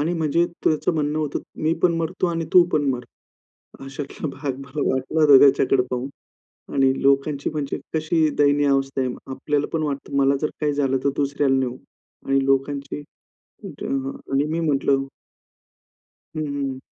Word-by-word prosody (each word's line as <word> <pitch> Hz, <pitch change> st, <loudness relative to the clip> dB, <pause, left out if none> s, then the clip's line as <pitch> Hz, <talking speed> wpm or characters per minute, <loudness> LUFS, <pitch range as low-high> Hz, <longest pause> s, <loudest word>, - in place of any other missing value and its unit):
आणि 160 Hz, +4 st, 0 dB
म्हणजे 160 Hz, +2 st, +2 dB, 0.2 s
त्याचं 155 Hz, +2 st, +2 dB
म्हणणं 150 Hz, 0 st, 0 dB
होतं 150 Hz, -2 st, -2 dB, 0.2 s
मी 155 Hz, -, +2 dB
पण 175 Hz, -2 st, +4 dB
मरतो 165 Hz, +3 st, -1 dB
आणि 165 Hz, -1 st, -1 dB
तू 180 Hz, -, +8 dB
पण 150 Hz, -, +2 dB
मर. 125 Hz, -1 st, -3 dB, 0.8 s
अशातला 135 Hz, +3 st, -6 dB
भाग 140 Hz, -2 st, -4 dB
मला 140 Hz, +2 st, -6 dB
वाटलं 130 Hz, +4 st, -2 dB
होतं 145 Hz, -3 st, +8 dB
त्याच्याकडे 135 Hz, -2 st, +4 dB
पाहून. 125 Hz, +2 st, -2 dB, 0.7 s
आणि 135 Hz, -1 st, +4 dB
लोकांची 140 Hz, +1 st, +1 dB
म्हणजे 150 Hz, -2 st, -3 dB, 0.2 s
कशी 155 Hz, 0 st, +2 dB
दयनीय 145 Hz, 0 st, +4 dB
अवस्था 135 Hz, 0 st, +1 dB
आहे. 125 Hz, -1 st, -2 dB
आपल्याला 140 Hz, +2 st, -1 dB
पण 160 Hz, -, 0 dB
वाटतं 140 Hz, -1 st, -3 dB
मला 140 Hz, 0 st, +3 dB
जर 155 Hz, -, -1 dB
काही 150 Hz, -1 st, +1 dB
झालं 135 Hz, -2 st, +1 dB
तर 140 Hz, -, +3 dB
दुसऱ्याला 140 Hz, -1 st, +1 dB
नाही 130 Hz, -2 st, +1 dB
होऊ. 125 Hz, -, -10 dB, 0.5 s
आणि 135 Hz, 0 st, +2 dB
लोकांची, 140 Hz, +1 st, -1 dB, 0.6 s
म्हंटलं, -, -, -4 dB
"हां." 135 Hz, -, -3 dB, 0.2 s
आणि 135 Hz, +1 st, +2 dB
मी 160 Hz, +2 st, -2 dB
म्हंटलं 140 Hz, -3 st, +1 dB, 1.3 s
हं, -, -, -1 dB
हं. 140 Hz, -2 st, -3 dB
140 Hz, 165 wpm, -22 LUFS, 135-155 Hz, 1.3 s, तू